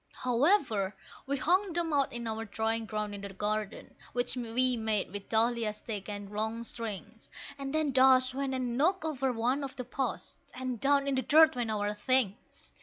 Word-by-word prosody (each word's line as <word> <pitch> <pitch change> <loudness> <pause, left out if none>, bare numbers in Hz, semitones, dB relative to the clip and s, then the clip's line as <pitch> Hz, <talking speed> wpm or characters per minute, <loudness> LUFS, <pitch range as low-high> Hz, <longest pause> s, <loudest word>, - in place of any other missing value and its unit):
However, 245 - +1 0.3
we 280 +1 0
hung 365 +6 +2
them 335 -2 -1
out 280 -2 +2
in 240 0 -5
our 220 0 -3
drying 225 +1 -2
ground 210 -1 -3
in 200 - -6
the 200 - -6
garden, 210 +1 -3 0.2
which 245 +1 0
we 250 +1 +1
made 220 -5 -1
with 205 -1 -7
dahlia 230 0 +2
sticks 210 -1 -5
and 205 -1 -5
long 220 +2 -2
strings, 225 -1 -6 0.3
And 275 0 -4
then 310 -1 +1
Dash 260 0 +5
went 270 0 -2
and 250 -2 -2
knocked 325 +6 +2
over 270 -4 0
one 250 +4 0
of 275 - -6
the 250 - -6
posts, 265 +2 -4 0.2
and 255 -2 -4
down 280 0 +3
in 280 - +1
the 260 - +1
dirt 315 +2 +6
went 240 -2 -2
our 210 -1 -1
things! 215 -1 -1
245 Hz, 185 wpm, -30 LUFS, 215-270 Hz, 0.3 s, dirt